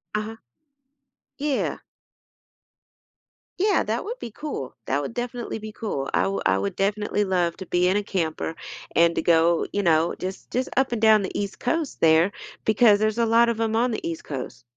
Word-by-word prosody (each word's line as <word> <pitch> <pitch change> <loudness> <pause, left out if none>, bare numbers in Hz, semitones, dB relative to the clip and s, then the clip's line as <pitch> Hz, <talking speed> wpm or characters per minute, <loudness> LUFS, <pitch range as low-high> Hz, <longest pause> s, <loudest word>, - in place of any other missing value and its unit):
Uh-huh. 215 +1 -3 1.0
Yeah. 290 -2 -1 1.8
Yeah, 410 +1 +3
that - - -2
would 470 +4 -5
be 230 - -7
cool. 220 - -6
That 140 +2 0
would 145 - -5
definitely 240 -1 -4
be 215 0 -8
cool. 140 -13 -3
I 90 - +2
wou 100 0 -2
I 95 0 +3
would 100 +1 -3
definitely 205 +1 0
love 180 -3 0
to 190 - -7
be 180 0 +2
in 190 - +2
a 205 - -1
camper 165 -4 -2 0.4
and 170 0 +5
to - - +1
go, 170 0 +3
you 205 - 0
know, 165 -1 +3
just 185 +1 -6
just 255 +2 -1
up 265 -2 +2
and 225 - -2
down 220 -2 +6
the 190 - -4
East 200 -1 -4
Coast, 315 +3 -2
there, 165 +3 +5 0.3
because 215 -1 +5
there's 215 +1 +1
a 235 - +3
lot 230 +1 +4
of 230 -1 -2
'em 225 -1 0
on 240 +2 +2
the 220 - -3
East 165 -1 -5
Coast. 135 -4 -6
205 Hz, 190 wpm, -24 LUFS, 170-230 Hz, 1.8 s, down